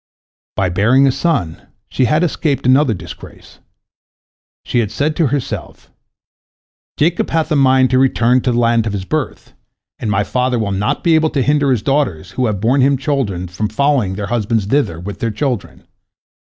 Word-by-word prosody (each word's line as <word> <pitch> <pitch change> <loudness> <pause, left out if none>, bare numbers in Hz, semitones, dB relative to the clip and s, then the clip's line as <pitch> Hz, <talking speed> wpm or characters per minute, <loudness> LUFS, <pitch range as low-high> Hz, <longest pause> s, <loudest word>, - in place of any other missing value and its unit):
By 95 -2 0
bearing 115 +10 +3
a 135 - +4
son, 135 - -2 0.2
she 130 - 0
had 155 +6 +2
escaped 150 -5 -1
another 130 -2 +3
disgrace. - - -12 1.1
She 120 - 0
had 110 -4 0
said 150 +7 -1
to 165 - +2
herself: 135 0 -5 1.1
"Jacob 165 +4 +1
hath 160 0 -1
a - - +3
mind 130 -2 +3
to 130 - +3
return 125 -1 +2
to 125 - 0
the 120 - -1
land 115 -1 +2
of 105 - -3
his 95 -2 -4
birth, - - -4 0.5
and 110 - -3
my 100 0 +1
father 125 +3 -1
will 110 -3 -2
not 100 +2 -1
be 170 - +3
able 160 0 +3
to 135 -4 -1
hinder 145 0 +2
his 125 -5 +1
daughters 130 - -1
who 125 +4 -1
have 105 -3 -2
borne 125 +7 +2
him 135 +1 +3
children 125 - -2
from 95 +4 -3
following 130 -6 0
their 100 0 -4
husband 110 0 -1
thither 105 - 0
with 100 +2 -7
their 115 - -1
children. 120 0 -4
125 Hz, 180 wpm, -16 LUFS, 105-140 Hz, 1.1 s, a